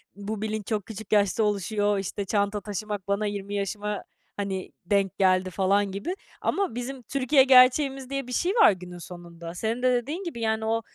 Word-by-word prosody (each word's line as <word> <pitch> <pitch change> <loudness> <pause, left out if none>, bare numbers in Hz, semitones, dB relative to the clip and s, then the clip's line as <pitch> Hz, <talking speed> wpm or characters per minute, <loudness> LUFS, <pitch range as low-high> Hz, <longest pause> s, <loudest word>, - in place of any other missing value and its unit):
bu 205 +1 -5
bilinç 215 -2 -3
çok 210 -3 -1
küçük 220 -1 -9
yaşta 205 +1 +3
oluşuyor, 205 0 +1
işte, 195 +1 -3
çanta 205 0 0
taşımak 205 -1 -5
bana 200 +1 0
20 205 0 -4
yaşıma, 205 +1 -3 0.3
hani, 195 -2 -3
denk 200 0 +1
geldi 185 -1 +3
falan 195 +2 +1
gibi. 200 - -3 0.3
Ama 385 - 0
bizim 250 +1 -5
Türkiye 265 +2 +3
gerçeğimiz 265 +1 +5
diye 275 -2 -3
bir - - -7
şey 360 +7 +1
var 440 - +7
günün 180 -1 -8
sonunda. 170 -1 -9
Senin 225 +6 -2
de 255 - +4
dediğin 290 +10 -2
gibi, 280 -10 -5
yani, 220 0 0
o 225 +1 +1
210 Hz, 180 wpm, -26 LUFS, 195-245 Hz, 0.3 s, var